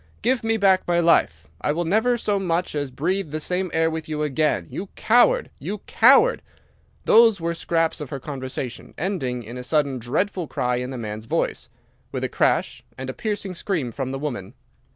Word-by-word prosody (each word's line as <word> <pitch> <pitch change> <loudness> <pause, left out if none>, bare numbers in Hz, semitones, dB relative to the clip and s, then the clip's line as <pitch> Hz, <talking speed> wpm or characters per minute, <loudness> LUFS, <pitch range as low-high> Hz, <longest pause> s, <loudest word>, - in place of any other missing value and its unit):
Give 245 +1 +1
me 225 0 +1
back 195 -3 +3
my 175 0 +2
life. 85 - +2
I - - +1
will 170 +2 -1
never 220 +7 +2
so 205 -3 0
much 180 -1 -1
as 145 -2 -2
breathe 170 +7 -1
the 155 +2 -3
same 180 +4 -1
air 160 0 +2
with 160 -1 -4
you 150 -1 -2
again! 150 - +1
You 195 - -6
coward! 245 - +3
You 210 - -4
coward!' 275 - +5 0.6
Those 225 -3 +6
were 170 0 -1
scraps 165 -1 0
of 145 - -6
her 140 - -5
conversation, 130 -2 -6
ending 135 -10 -2
in 120 +3 -8
a - - -6
sudden 140 -2 +1
dreadful 170 - -1
cry 125 -2 -1
in 125 +1 -3
the 130 - -5
man's 110 -1 -6
voice, - - -1 0.4
with - - -3
a - - -1
crash, - - 0
and 130 0 -4
a - - -11
piercing 205 - -3
scream 170 - -2
from 135 0 -4
the 135 - -3
woman. 125 -10 -5
160 Hz, 195 wpm, -23 LUFS, 130-195 Hz, 0.6 s, Those